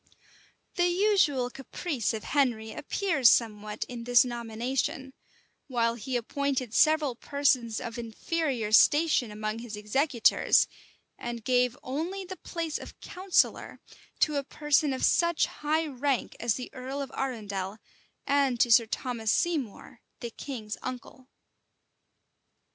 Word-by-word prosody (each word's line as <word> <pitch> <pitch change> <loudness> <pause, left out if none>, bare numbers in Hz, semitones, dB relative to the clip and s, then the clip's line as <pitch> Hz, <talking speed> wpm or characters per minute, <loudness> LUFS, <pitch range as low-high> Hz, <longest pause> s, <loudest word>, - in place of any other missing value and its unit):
[*] - - -34
The 350 0 +4
usual 350 -9 +2
caprice 270 - -3
of 220 -2 -5
Henry 240 -6 0
appears 300 - +2
somewhat 210 -2 0
in 240 -2 -7
this 245 0 +5
nomination; 245 +3 -3 0.5
while 235 -3 +1
he 240 +3 -5
appointed 260 -1 -2
several 310 -3 +4
persons 255 -4 0
of 235 -1 -6
inferior 235 0 -2
station 295 +1 +5
among 215 +1 -4
his 230 -2 -7
executors, 235 +4 +3 0.5
and 235 -1 -5
gave 250 0 +2
only 335 +9 -4
the 375 0 -8
place 330 -3 -4
of - - -11
counsellor 370 0 0 0.4
to 300 -2 +3
a 280 - -1
person 295 +1 +1
of 260 - 0
such 340 -1 +3
high 310 +2 -1
rank 275 -2 -2
as 235 -2 +1
the 250 - -6
earl 260 +2 -5
of 275 -2 -5
Arundel, 205 -6 -3 0.5
and 275 -4 +2
to 240 - +3
Sir 230 0 +6
Thomas 225 -2 -2
Seymour, 275 - -2 0.2
the 235 - -6
king's 225 -5 -6
uncle. 255 0 -8
255 Hz, 130 wpm, -28 LUFS, 230-290 Hz, 0.5 s, Sir